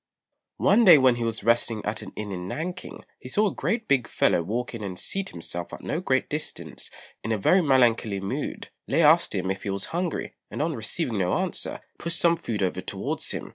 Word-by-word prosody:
One 225 +4 +5
day 180 -7 +10
when 130 -3 +4
he 120 - -2
was 115 -2 -2
resting 115 -1 +2
at 105 +1 -2
an - - -9
inn 105 -1 -5
in 90 -1 -5
Nanking, 175 - -5
he 125 - -9
saw 210 +10 +3
a 200 - 0
great 225 0 -1
big 135 -4 +2
fellow - - +2
walk 115 +9 -3
in 115 -2 -6
and 95 -3 -5
seat 195 - -2
himself 85 0 -6
at - - -7
no - - -1
great - - +1
distance - - -5 0.3
in 110 - -2
a 110 - +2
very 180 - +4
melancholy 120 - +3
mood. 95 +1 -4 0.2
Lê 155 +5 +3
asked 160 -5 +5
him 95 0 0
if 95 - -4
he - - -4
was 100 0 -1
hungry, 175 -1 -2 0.2
and - - -6
on 160 +2 0
receiving 115 - -2
no 90 -1 +1
answer, - - -2 0.2
pushed 170 +1 -2
some 170 0 +4
food 115 -11 -3
over 95 - -1
towards - - -4
him. - - -5
120 Hz, 215 wpm, -26 LUFS, 100-165 Hz, 0.3 s, day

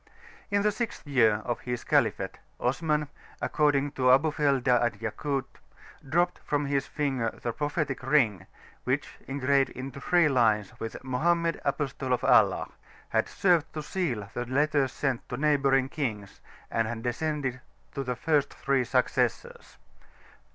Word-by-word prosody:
In 200 -1 +1
the 210 - +3
sixth 225 -2 -4
year 110 -6 +3
of 120 - -2
his 125 -1 -4
caliphate, - - +1 0.2
Osman, 150 +3 0 0.3
according 145 -2 +1
to 130 -2 +1
Abulfeda 135 -3 +3
and 120 -4 0
Yakut, 135 +5 -2 0.6
dropped 175 +3 +1
from 145 0 -1
his 140 -1 0
finger 135 -6 -1
the 120 - -1
propheti[c] 145 -1 -2
ring 130 - +2 0.4
which, - - -2
engraved 135 0 +2
in 130 +1 -7
three 170 +5 +2
lines 115 -7 +2
with 115 +2 -6
"Mohammed 165 +6 +1
Apostle 135 -3 -1
(of) 125 - -1
Allah," - - +4 0.4
had - - +1
served 175 -5 +2
to 155 - -3
seal 135 - -2
the 120 - -3
letters 140 0 +1
sent 135 -4 -2
to - - -4
neighbouring 140 -3 +3
kings, 110 -9 -4 0.3
and 115 -1 +1
had 115 0 -5
descended 130 0 -2 0.3
to 140 - -3
the 125 -1 -2
first 150 +3 +1
three 135 -2 0
successors. 125 +1 -1
135 Hz, 140 wpm, -28 LUFS, 125-150 Hz, 0.6 s, Allah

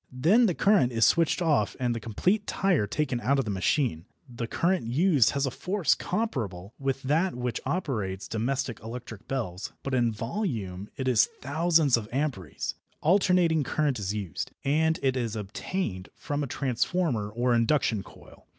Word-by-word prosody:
Then 180 - +4
the 180 - 0
current 195 -12 +4
is 115 -1 +3
switched 170 +2 +3
off 145 -11 +2
and 125 -2 +1
the 115 - -3
complete 180 - 0
tyre 180 - +1
taken 125 +1 -1
out 140 +3 +2
of 135 - 0
the 105 - -2
machine. 95 - 0 0.2
The 120 -2 -5
current 175 0 0
used 145 - +4
has 140 0 +1
a 135 - -1
force 185 +5 +1
comparable 115 - -3
with 135 -1 -2
that 160 +6 +1
which 125 -1 -3
operates 105 - -2
domestic 120 +1 -2
electric 115 -1 -8
bells, 105 -9 -4
but 135 - -3
in 120 -2 +2
volume 110 - -3
it 130 - -2
is 125 -4 +4
thousands 155 -1 +3
of 110 -2 -6
amperes. 125 - -2 0.3
Alternating 175 -2 +3
current 145 -3 0
is 100 -1 -2
used, 100 -8 -4
and 160 +3 +2
it 135 -1 +2
is 115 -3 -2
obtained 105 - -4
from 145 0 -3
a 145 - -2
transformer 130 - 0
or 120 +3 +1
induction 115 -2 +2
coil. - - -16
130 Hz, 165 wpm, -27 LUFS, 110-160 Hz, 0.3 s, Then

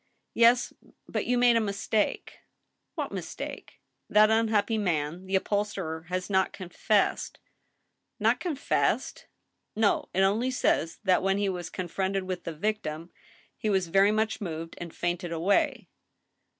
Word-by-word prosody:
"Yes, 235 +1 +4 0.3
but - - -3
you 250 - +2
made 240 -1 +5
a - - +3
mistake." 205 +1 -1 0.6
"What - - -3
mistake.^" - - -7 0.3
That 215 +1 +5
unhappy 220 -1 +2
man, 170 -1 -2
the 190 - 0
upholsterer, 190 -5 -2
has 185 0 -2
not 190 -2 +1
confessed." 195 +2 0 0.3
* - - -49
" - - -53
Not - - +3
confessed 310 -6 -1
I - - -42 0.2
" - - -51
" - - -53
No. 210 - +2
It 190 - +1
only 210 +6 +2
says 170 -9 0
that 185 -3 +3
when 195 +1 +1
he 200 -1 +1
was 175 -2 -4
confronted 190 +2 -2
with 185 -1 -5
the 165 - -4
victim 170 -3 -3 0.4
he 215 - -2
was 190 -4 +1
very 195 +3 +5
much 220 +1 0
moved 165 -3 -5
and 175 -1 -6
fainted 175 0 -3
away." 170 +5 +1
195 Hz, 155 wpm, -28 LUFS, 175-215 Hz, 0.6 s, made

